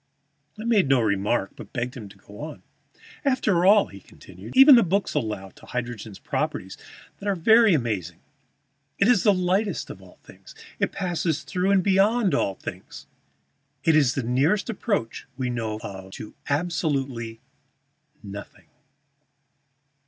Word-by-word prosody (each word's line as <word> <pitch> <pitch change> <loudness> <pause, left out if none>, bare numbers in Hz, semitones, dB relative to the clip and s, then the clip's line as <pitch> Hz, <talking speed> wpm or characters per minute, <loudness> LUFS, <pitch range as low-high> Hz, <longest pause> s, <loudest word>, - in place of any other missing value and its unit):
I - - -5
made 215 - +2
no 135 -2 +5
remark, 100 -1 0
but - - -12
begged 125 0 -3
him 110 -6 -8
to - - -17
go 105 - -15
on. 150 +1 -8 0.6
"After 210 - +2
all," 205 +1 +6
he - - -12
continued, - - -12
"even 275 +2 +10
the 240 - +8
books 195 +1 0
allow 105 -4 -3
to - - -18
hydrogen 120 -4 -5
properties - - -3 0.4
that 205 - -7
are 200 - +1
very 220 +3 +5
amazing. 95 - -3 0.8
It 200 - +3
is 245 -6 +4
the 205 - +5
lightest 190 +3 0
of - - -11
all - - -17
things; - - -15 0.2
it - - 0
passes 175 -4 -2
through 185 0 -1
and 195 -2 +3
beyond 200 +2 +3
all 100 - 0
things; - - -9 0.8
it 165 +1 +4
is 140 -5 +3
the 135 - -1
nearest 145 - +1
approach 200 - -3
we 125 -2 -2
know 110 -3 -3
of 95 -1 -8
to 105 - -9
absolute 140 -7 -2 0.8
nothing. 100 0 -10
155 Hz, 150 wpm, -24 LUFS, -, 0.8 s, even